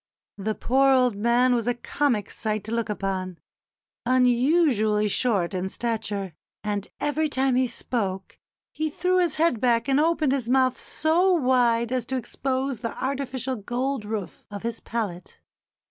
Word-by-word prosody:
The 215 Hz, +2 st, -2 dB
poor 270 Hz, +2 st, +3 dB
old 250 Hz, -4 st, +3 dB
man 240 Hz, +4 st, +3 dB
was 235 Hz, -1 st, 0 dB
a 245 Hz, -, +1 dB
comic 240 Hz, -3 st, -1 dB
sight 215 Hz, -2 st, -2 dB
to 220 Hz, -, -5 dB
look 230 Hz, -1 st, -1 dB
upon 190 Hz, -3 st, -3 dB, 0.7 s
unusually 250 Hz, -3 st, +3 dB
short 205 Hz, -4 st, +1 dB
in 185 Hz, 0 st, -2 dB
stature; 210 Hz, -5 st, -3 dB, 0.3 s
and 205 Hz, -1 st, -2 dB
every 305 Hz, +1 st, 0 dB
time 265 Hz, -1 st, +1 dB
he 255 Hz, 0 st, +3 dB
spoke 195 Hz, -6 st, -3 dB, 0.3 s
he 315 Hz, 0 st, -2 dB
threw 365 Hz, +4 st, +1 dB
his 345 Hz, -3 st, +1 dB
head 310 Hz, -8 st, +1 dB
back 235 Hz, -1 st, +2 dB
and 275 Hz, +1 st, +3 dB
opened 315 Hz, -3 st, +2 dB
his 260 Hz, -4 st, -1 dB
mouth 255 Hz, 0 st, +3 dB
so 335 Hz, +5 st, +2 dB
wide 245 Hz, -6 st, +2 dB
as 255 Hz, -2 st, -1 dB
to 265 Hz, -, -1 dB
expose 260 Hz, 0 st, -2 dB
the 230 Hz, -1 st, -5 dB
artificial 265 Hz, -1 st, -2 dB
gold 245 Hz, +4 st, -2 dB
roof 210 Hz, -3 st, -5 dB
of 205 Hz, 0 st, -7 dB
his 230 Hz, -1 st, -3 dB
palate. 205 Hz, -7 st, -4 dB
245 Hz, 155 wpm, -25 LUFS, 215-270 Hz, 0.7 s, poor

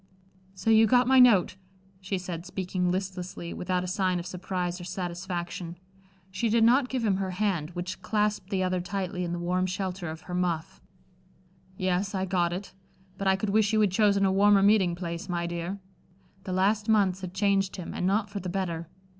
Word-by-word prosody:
"So 190 Hz, +4 st, 0 dB
you 220 Hz, 0 st, +6 dB
got 250 Hz, +1 st, +4 dB
my 265 Hz, 0 st, +6 dB
note," 205 Hz, -7 st, +5 dB, 0.4 s
she 190 Hz, +1 st, -3 dB
said, 175 Hz, -2 st, -5 dB
speaking 185 Hz, -1 st, -2 dB
listlessly, 185 Hz, -2 st, -4 dB
without 180 Hz, 0 st, -1 dB
a -, -, -4 dB
sign 185 Hz, 0 st, 0 dB
of 170 Hz, -, -5 dB
surprise 180 Hz, 0 st, -3 dB
or -, -, -7 dB
satisfaction. 175 Hz, -1 st, -5 dB, 0.5 s
She 225 Hz, +4 st, -1 dB
did 225 Hz, +1 st, +3 dB
not 250 Hz, +3 st, +4 dB
give 255 Hz, -3 st, -1 dB
him 195 Hz, -3 st, +2 dB
her 190 Hz, -1 st, -2 dB
hand, 180 Hz, -5 st, -1 dB
which 180 Hz, +1 st, -5 dB
clasped 210 Hz, -3 st, -1 dB
the 190 Hz, -2 st, 0 dB
other 185 Hz, -1 st, 0 dB
tightly, 180 Hz, -1 st, -3 dB
in 175 Hz, -, -3 dB
the 175 Hz, -, -2 dB
warm 180 Hz, +2 st, 0 dB
shelter 185 Hz, -2 st, -3 dB
of 160 Hz, +1 st, -7 dB
her 180 Hz, -, -9 dB
muff. 175 Hz, -3 st, -2 dB, 1.0 s
"Yes, 185 Hz, +2 st, -1 dB
I 190 Hz, 0 st, 0 dB
got 175 Hz, -2 st, +1 dB
it; 185 Hz, +3 st, -6 dB, 0.5 s
but 195 Hz, -, -1 dB
I 190 Hz, -, +5 dB
could 195 Hz, +1 st, -2 dB
wish 215 Hz, 0 st, +2 dB
you 215 Hz, -, +4 dB
had 205 Hz, -3 st, +3 dB
chosen 200 Hz, 0 st, +3 dB
a 190 Hz, -, +3 dB
warmer 200 Hz, +1 st, +5 dB
meeting 200 Hz, -4 st, +4 dB
place, 170 Hz, 0 st, -5 dB
my 170 Hz, -1 st, -1 dB
dear." 170 Hz, +3 st, -4 dB, 0.7 s
The 185 Hz, -, -3 dB
last 205 Hz, +4 st, +1 dB
months 195 Hz, -4 st, +3 dB
had 185 Hz, -1 st, -7 dB
changed 195 Hz, -1 st, +1 dB
him, 180 Hz, -3 st, -6 dB
and 180 Hz, -, -1 dB
not 205 Hz, +2 st, +1 dB
for 200 Hz, 0 st, -5 dB
the 180 Hz, -1 st, -5 dB
better. 175 Hz, -3 st, -3 dB
185 Hz, 195 wpm, -27 LUFS, 180-200 Hz, 1.0 s, you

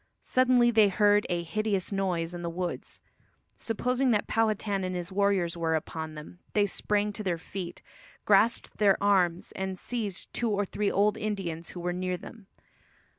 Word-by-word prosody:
Suddenly 250 Hz, -2 st, +4 dB
they 220 Hz, -2 st, +6 dB
heard 205 Hz, +1 st, +3 dB
a 175 Hz, -1 st, 0 dB
"hideous 205 Hz, +1 st, -1 dB
noise" 180 Hz, -4 st, -1 dB
in 175 Hz, -, -6 dB
the 170 Hz, -, -3 dB
woods. 175 Hz, +1 st, -5 dB, 0.6 s
Supposing 250 Hz, +3 st, 0 dB
that 210 Hz, -3 st, +2 dB
Powhatan 215 Hz, -3 st, 0 dB
and 185 Hz, 0 st, -2 dB
his 175 Hz, 0 st, -4 dB
warriors 195 Hz, -3 st, +1 dB
were 165 Hz, -1 st, 0 dB
upon 160 Hz, 0 st, -4 dB
them, 150 Hz, +4 st, -10 dB
they 205 Hz, -1 st, +4 dB
sprang 205 Hz, +1 st, 0 dB
to 215 Hz, -, -5 dB
their 180 Hz, -4 st, 0 dB
feet, 175 Hz, +1 st, -7 dB, 0.4 s
grasped 215 Hz, +3 st, +3 dB
their 200 Hz, -2 st, +5 dB
arms 185 Hz, -4 st, +2 dB
and 190 Hz, -1 st, -4 dB
seized 210 Hz, -3 st, -3 dB
two 235 Hz, -, 0 dB
or 205 Hz, -1 st, +1 dB
three 205 Hz, +1 st, -1 dB
old 205 Hz, +1 st, +2 dB
Indians 185 Hz, -6 st, -3 dB
who 180 Hz, -, -8 dB
were 175 Hz, 0 st, -1 dB
near 180 Hz, 0 st, -2 dB
them. 210 Hz, +2 st, -12 dB
195 Hz, 170 wpm, -28 LUFS, 175-210 Hz, 0.6 s, they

